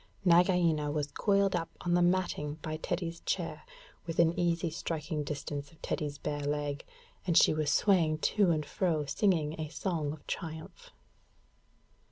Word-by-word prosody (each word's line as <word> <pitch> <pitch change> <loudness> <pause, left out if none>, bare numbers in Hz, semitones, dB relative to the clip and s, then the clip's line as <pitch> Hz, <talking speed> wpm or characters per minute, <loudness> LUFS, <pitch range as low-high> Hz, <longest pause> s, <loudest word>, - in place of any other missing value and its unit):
Nagaina 170 -4 +4
was 145 -1 -2
coiled 200 +3 +2
up 165 -1 -2
on 175 - 0
the 175 - +4
matting 175 -5 +1
by 155 0 -3
Teddy's 170 0 -3
chair, - - -3 0.5
within 165 0 +3
easy 170 -1 0
striking 155 -2 -3
distance 145 -1 -5
of 160 - -21
Teddy's 145 -2 -2
bare 145 0 -3
leg, 145 0 -2 0.4
and 170 - +3
she - - +6
was 155 -1 0
swaying 170 -6 +3
to 200 +4 +2
and 155 -3 +1
fro 160 -6 0
singing 160 -1 +1
a 155 - -4
song 165 -3 -2
of 150 -1 -10
triumph. 165 - -6
160 Hz, 150 wpm, -31 LUFS, 150-175 Hz, 0.5 s, she